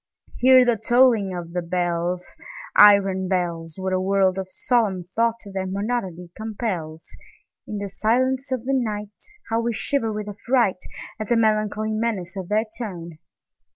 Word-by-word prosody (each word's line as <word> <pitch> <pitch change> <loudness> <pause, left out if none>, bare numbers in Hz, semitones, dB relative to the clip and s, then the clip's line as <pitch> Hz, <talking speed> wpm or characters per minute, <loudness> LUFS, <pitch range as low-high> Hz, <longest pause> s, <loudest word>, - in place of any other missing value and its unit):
Hear 255 0 +7
the 240 -2 +2
tolling 230 -3 +3
of 170 -1 -7
the 180 - -1
bells, 175 0 -2 0.4
Iron 195 -2 +6
bells! 170 -3 -2
What 190 0 -2
a 185 - +2
world 190 0 +2
of 190 - -4
solemn 205 -4 0
thought 230 +6 0 0.2
their 190 -1 -2
monody 190 -4 -3
compels! 195 -8 -5 0.5
In 210 - -4
the 200 0 -4
silence 255 +7 0
of 255 -2 -2
the 270 - 0
nightHow 225 - -3
we 235 0 -1
shiver 225 0 -1
with 210 0 -4
affrightAt 210 -1 0 0.5
the 235 - +3
melancholy 215 -1 +1
menace 215 -5 -2
of 190 -3 -6
their 215 +2 +2
tone! 170 -8 -7
205 Hz, 145 wpm, -23 LUFS, 185-230 Hz, 0.5 s, Hear